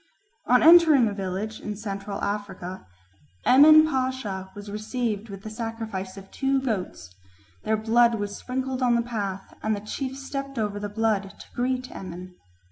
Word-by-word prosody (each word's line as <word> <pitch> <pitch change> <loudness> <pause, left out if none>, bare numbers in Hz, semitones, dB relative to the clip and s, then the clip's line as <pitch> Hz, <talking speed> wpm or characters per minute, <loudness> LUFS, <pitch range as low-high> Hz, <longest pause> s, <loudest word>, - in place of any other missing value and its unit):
On 250 0 +5
entering 320 -6 +7
a 205 - -2
village 200 +2 -4
in 210 - -5
Central 200 -1 -5
Africa 195 - -4 0.6
Emin 310 +4 +8
Pasha 255 -9 -2
was 205 0 -8
received 215 0 -3
with 195 0 -9
the 215 - -6
sacrifice 220 -4 -5
of 195 0 -12
two 270 0 +1
goats; 190 - -4 0.5
their 220 0 +2
blood 230 +2 +4
was 205 -1 -4
sprinkled 260 +1 -3
on 245 -2 +3
the 235 - +2
path 200 -5 -4
and 215 0 0
the - - -5
chief 260 +6 -5
stepped 275 0 -6
over 205 -2 -1
the 205 0 -4
blood 205 -2 -1
to - - -11
greet 255 +1 -2
Emin. 180 0 -8
220 Hz, 160 wpm, -25 LUFS, 200-255 Hz, 0.6 s, Emin